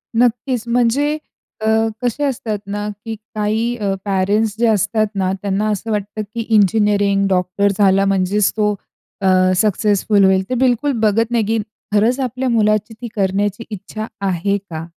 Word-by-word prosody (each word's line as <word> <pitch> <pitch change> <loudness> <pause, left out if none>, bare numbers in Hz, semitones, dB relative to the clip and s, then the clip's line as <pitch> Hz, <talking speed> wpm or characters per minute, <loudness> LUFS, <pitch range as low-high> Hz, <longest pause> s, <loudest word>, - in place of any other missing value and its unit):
नक्कीच. 245 +1 +1
म्हणजे 250 +6 +1 0.4
अ, 220 - -1 0.3
कसे 250 +4 -1
असतात 235 -6 -2
ना, 205 +1 -3 0.2
की 225 - -4 0.2
काही 220 +3 0
अ, 200 -3 -1
पेरेंट्स 200 +2 +1
जे 235 - +3
असतात 215 +1 +1
ना, 190 -1 0
त्यांना 205 +1 -1
असं 220 +2 -3
वाटतं 210 +1 -3
की 235 - -2
इंजिनिअरिंग, 205 -1 +3
डॉक्टर 190 +2 +1
झाला 195 -1 +4
म्हणजेच 195 +1 +2
तो 210 -1 +2 0.5
अ, 190 - +1 0.3
सक्सेसफुल 205 0 +2
होईल. 190 0 +3
ते - - -1
बिलकुल 260 +3 +2
बघत 225 +2 +2
नाही, 230 -2 +2
की 225 +2 0 0.4
खरंच 230 +5 +3
आपल्या 255 0 -2
मुलाची 215 -1 +1
ती 240 - -4
करण्याची 200 +2 0
इच्छा 215 +1 -6 0.2
आहे 190 +2 0
का? 165 -5 -8
210 Hz, 150 wpm, -18 LUFS, 200-230 Hz, 0.5 s, झाला